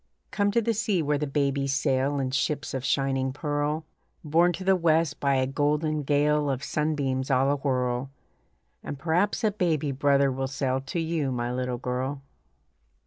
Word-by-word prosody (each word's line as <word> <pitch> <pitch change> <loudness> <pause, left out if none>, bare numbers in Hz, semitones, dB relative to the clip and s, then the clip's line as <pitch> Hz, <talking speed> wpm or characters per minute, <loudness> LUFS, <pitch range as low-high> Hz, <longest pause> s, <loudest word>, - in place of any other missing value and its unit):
Come 205 -1 +1
to 230 +3 +1
the 230 - +1
sea 205 -5 0
where 145 0 0
the 150 - -1
babies 140 -1 0
sail 140 +1 +1
In 130 -1 -1
ships 140 +2 -1
of 130 -2 -3
shining 135 -1 0
pearl, 145 +2 -2 0.4
Borne 165 +3 +3
to 185 - -6
the 190 0 +4
west 165 -4 +2
by 140 -1 +2
a 130 0 +2
golden 150 +3 0
gale 145 +1 +2
Of 135 0 -2
sun 155 +1 -1
beams 130 -2 -1
all 135 +1 +3
awhirl; 130 -2 -1 0.7
And 145 - -5
perhaps 175 - 0
a 215 - +3
baby 160 -7 0
brother 140 0 +3
will 135 +1 -2
sail 130 -1 -1
To 135 +6 -4
you, 160 -4 -1
my 120 -1 -2
little 125 -1 -2
girl. 130 +3 -3
145 Hz, 175 wpm, -26 LUFS, 135-155 Hz, 0.7 s, the